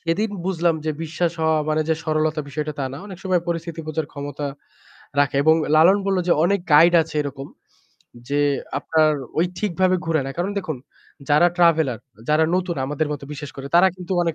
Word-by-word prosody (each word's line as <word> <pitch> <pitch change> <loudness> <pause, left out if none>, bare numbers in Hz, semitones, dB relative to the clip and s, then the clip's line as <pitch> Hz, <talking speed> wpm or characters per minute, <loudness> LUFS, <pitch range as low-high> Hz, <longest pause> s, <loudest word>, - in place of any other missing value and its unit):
সেদিন 190 +6 -1 0.2
বুঝলাম 170 -3 +1
যে 155 - 0
বিশ্বাস 165 +2 -1
হওয়া 160 0 +2
মানে 155 0 +1
যে 160 - +3
সরলতা 155 0 0
বিষয়টা 150 +2 -3
তা 135 - -1
না। - - -6
অনেক 190 -3 -9
সময় 185 -2 +2
পরিস্থিতি 165 -1 -3
বোঝার 155 -1 -2
ক্ষমতা 145 0 -5 0.7
রাখে 140 -1 +2
এবং 160 +1 +5 0.2
লালন 170 +6 +6
বলল 195 -1 +1
যে - - +3
অনেক 200 +3 +2
গাইড 165 +4 +7
আছে 160 -1 -7
এরকম 140 -1 -6 0.8
যে 145 +1 +1 0.4
আপনার 155 -1 +2 0.3
ওই 170 - +3
ঠিকভাবে 185 -2 +1
ঘুরে 160 -2 +1
না। 135 - -4
কারণ 180 +3 -1
দেখুন 160 -7 -4 0.5
যারা 150 +4 +5
ট্রাভেলার, 160 -9 +3 0.3
যারা 155 +1 +4
নতুন 180 -1 -1
আমাদের 150 +2 -1
মত 145 - -6
বিশেষ 145 0 -7
করে, 135 0 -7
তারা 185 +2 +7
কিন্তু 180 0 -6
অনেক 165 -2 -1
160 Hz, 185 wpm, -22 LUFS, 150-175 Hz, 0.8 s, গাইড